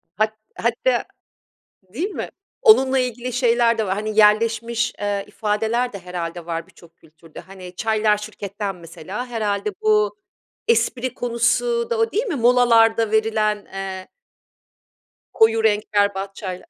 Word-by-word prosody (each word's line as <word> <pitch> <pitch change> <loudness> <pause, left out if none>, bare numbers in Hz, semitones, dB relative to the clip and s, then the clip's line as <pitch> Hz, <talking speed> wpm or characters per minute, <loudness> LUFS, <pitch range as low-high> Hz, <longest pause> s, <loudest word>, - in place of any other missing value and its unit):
Hat 215 +1 0 0.2
hatta, 235 +1 0 0.9
değil 350 - -2
mi? - - -5 0.3
Onunla 265 - +5
ilgili 250 0 -3
şeyler 235 -2 +2
de 220 - 0
var, 190 - 0
hani, 215 +1 -4
yerleşmiş, 230 +2 +2
eee, 205 -1 -2
ifadeler 220 +3 -1
de 200 - -6
herhâlde 175 -1 -6
var 165 -1 -4
birçok 170 -1 -19
kültürde. 160 0 -15
Hani, 185 -1 -12
"çaylar 215 0 +1
şirketten" 205 -1 -6
mesela 180 +7 -7
herhâlde 220 - -2
bu 430 +1 +2 0.5
espri 255 - +1
konusu 255 - 0
da 470 - 0
o 455 0 +1
değil 445 +5 0
mi, 390 -10 -2
molalarda 230 -3 +4
verilen, 215 -1 +1
eee 190 -1 -5 1.3
koyu 225 0 +3
renk 210 -1 +1
berbat 200 -1 0
çaylar. 190 - -7
220 Hz, 135 wpm, -21 LUFS, 200-245 Hz, 1.3 s, Onunla